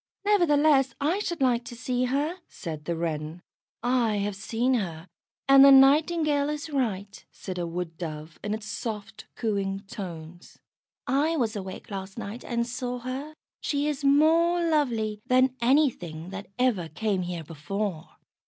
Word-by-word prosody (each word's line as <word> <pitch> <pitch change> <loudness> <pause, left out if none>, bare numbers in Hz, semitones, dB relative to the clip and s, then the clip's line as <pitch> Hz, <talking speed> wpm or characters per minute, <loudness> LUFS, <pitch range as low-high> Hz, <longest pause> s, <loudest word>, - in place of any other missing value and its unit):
"Nevertheless, 300 -9 +4
I 320 +8 +1
should 345 -7 -3
like 245 -2 +3
to 240 - -8
see 250 +1 -1
her," 290 +8 -1
said 155 -4 -7
the 170 - -1
Wren. 160 0 -4 0.4
"I 240 -3 +2
have 205 0 -1
seen 230 +5 0
her, 175 -7 -2 0.4
and 275 0 +8
the 275 - +9
Nightingale 290 +2 +5
is 300 +1 -4
right," 205 -7 -2
said 185 -2 -6
a 170 - -2
Wood 165 -1 -5
dove 155 -2 -6
in 210 +1 -1
its 220 -1 -8
soft, 215 -1 -6
cooing 195 -3 -1
tones. 175 -5 -9 0.5
"I 295 +6 +1
was 230 -5 0
awake 190 +1 -7
last 195 -1 -6
night 215 +5 -6
and 235 -1 -1
saw 250 +1 -4
her; 260 +5 -6 0.2
she 290 0 -1
is 295 -1 -2
more 330 +5 +4
lovely 230 -9 0
than 255 0 +3
anything 220 - +1
that 195 0 -7
ever 230 -10 +1
came 200 +3 -1
here 175 -2 -4
before." 165 +3 -4
235 Hz, 155 wpm, -27 LUFS, 190-280 Hz, 0.5 s, the